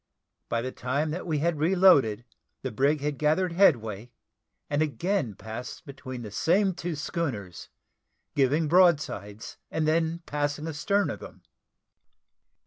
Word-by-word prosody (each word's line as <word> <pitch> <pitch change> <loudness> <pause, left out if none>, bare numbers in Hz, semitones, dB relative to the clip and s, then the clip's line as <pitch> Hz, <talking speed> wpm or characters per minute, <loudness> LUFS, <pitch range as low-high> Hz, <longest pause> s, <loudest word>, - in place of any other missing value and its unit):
By 115 0 -1
the 130 - -3
time 140 +6 -2
that 180 +3 -5
we 155 -3 0
had 160 +1 0
reloaded, 155 - +4 0.4
the 130 - -3
brig 140 +6 +1
had 145 -2 -2
gathered 160 +4 +2
headway, 120 - +2 0.6
and 145 +1 0
again 155 - -1
passed 110 - -8
between 130 -3 -8
the 105 - -8
same 190 - +2
two 175 -2 -4
schooners, 125 - -4 0.6
giving 145 +3 +2
broadsides, 145 - +2
and 155 -1 -1
then 165 +1 0
passing 145 +1 -2
astern 200 +7 0
of - - -7
them. - - -12
150 Hz, 135 wpm, -27 LUFS, 125-170 Hz, 0.6 s, reloaded